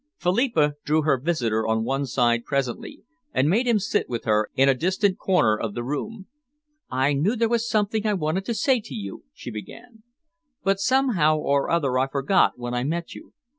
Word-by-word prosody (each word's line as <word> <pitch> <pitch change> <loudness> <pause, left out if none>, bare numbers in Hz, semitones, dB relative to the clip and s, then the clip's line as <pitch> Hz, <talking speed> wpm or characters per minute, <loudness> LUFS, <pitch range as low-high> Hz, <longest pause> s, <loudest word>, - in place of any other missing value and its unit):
Philippa 180 - +1
drew 155 +1 +1
her 140 -4 +2
visitor 120 -8 -1
on 110 0 +1
one 135 +3 -1
side 120 -2 +1
presently, 140 - -3 0.3
and 130 - +2
made 225 +10 +2
him 235 -2 +4
sit 205 +1 -1
with 120 -2 -3
her 105 -1 +1
in 135 +1 +4
a 135 - +5
distant 190 - 0
corner 180 - +2
of 105 -1 -4
the 120 - -3
room. 190 - -5 0.6
"I 130 +3 +1
knew 170 - +1
there 230 -1 +1
was 235 0 0
something 215 0 0
I 210 - +1
wanted 170 +2 -1
to 235 - -2
say 265 -1 +2
to 215 - -9
you," 100 - -7
she - - -9
began, 220 - -10 0.6
"but 195 0 +1
somehow 205 - +2
or 140 -2 0
other 140 -7 +1
I 130 - +1
forgot 140 +7 +2
when 120 0 -5
I 125 0 -1
met 165 +4 -3
you. 315 - -13
155 Hz, 195 wpm, -24 LUFS, 130-205 Hz, 0.6 s, a